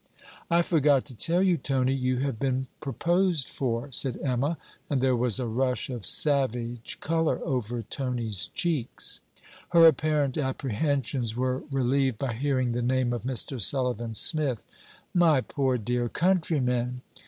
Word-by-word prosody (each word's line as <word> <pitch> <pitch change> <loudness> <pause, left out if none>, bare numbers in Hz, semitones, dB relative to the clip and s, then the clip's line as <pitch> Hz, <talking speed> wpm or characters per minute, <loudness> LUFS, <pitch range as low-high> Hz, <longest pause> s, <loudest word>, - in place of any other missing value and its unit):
'I 170 +1 +4
forgot 145 -5 +3
to 130 - -9
tell 170 - +2
you, 180 -3 +3
Tony, 130 -2 0
you 130 -1 0
have 135 -5 -2
been 130 -1 0
proposed 170 - 0
for,' 125 +1 -3
said 130 0 -1
Emma; 140 +5 0 0.3
and 140 - +1
there 130 0 +2
was 120 -2 +2
a 125 - -1
rush 125 +1 -1
of 120 -5 -5
savage 120 -5 +1
colour 165 0 0
over 120 -5 -2
Tony's 120 -9 -2
cheeks. 160 -9 0 0.5
Her 170 -1 +7
apparent 150 -2 +3
apprehensions 130 -2 -1
were 130 +1 -1
relieved 135 -2 +1
by 130 -1 -2
hearing 130 0 0
the 120 +1 -1
name 125 0 +1
of 120 - -3
Mr. 130 +1 -1
Sullivan 120 0 0
Smith. 140 -4 +1 0.5
'My 170 -5 +4
poor 130 0 -1
dear 120 +2 -1
countryman! 125 -9 0
130 Hz, 140 wpm, -27 LUFS, 120-145 Hz, 0.5 s, Her